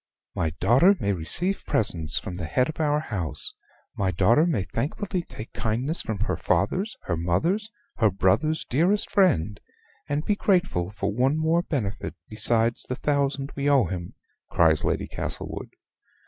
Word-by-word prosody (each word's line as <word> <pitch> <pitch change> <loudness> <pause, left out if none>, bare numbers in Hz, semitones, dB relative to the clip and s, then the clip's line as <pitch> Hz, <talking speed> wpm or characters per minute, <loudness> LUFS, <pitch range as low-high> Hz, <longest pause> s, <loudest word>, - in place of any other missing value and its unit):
"My 80 - 0
daughter 135 - +5
may 100 -1 0
receive 170 - -1
presents 80 -7 +2
from 95 - -7
the 90 -3 -5
Head 125 - +1
of 155 - -7
our 150 -1 +2
House: 95 - -3 0.4
my 95 -1 0
daughter 115 - +3
may 135 - 0
thankfully 175 - -3
take 115 -8 -10
kindness 125 +9 -1
from 105 -3 -4
her 110 - 0
father's, 200 +4 0
her 85 - -1
mother's, 165 - 0 0.3
her 110 -3 +4
brother's 100 - +1
dearest 175 +10 +1
friend; 120 - +2 0.5
and 145 +2 -1
be 210 - +2
grateful 180 - +1
for 100 0 -3
one 130 +6 +2
more 160 +2 +2
benefit 115 - -3
besides 115 +1 +1
the 125 - -1
thousand 140 0 -1
we 140 +1 0
owe 135 -5 +5
him," 90 -1 -6 0.3
cries 80 -3 +3
Lady - - -1
Esmond. - - -5
125 Hz, 155 wpm, -25 LUFS, 95-160 Hz, 0.5 s, daughter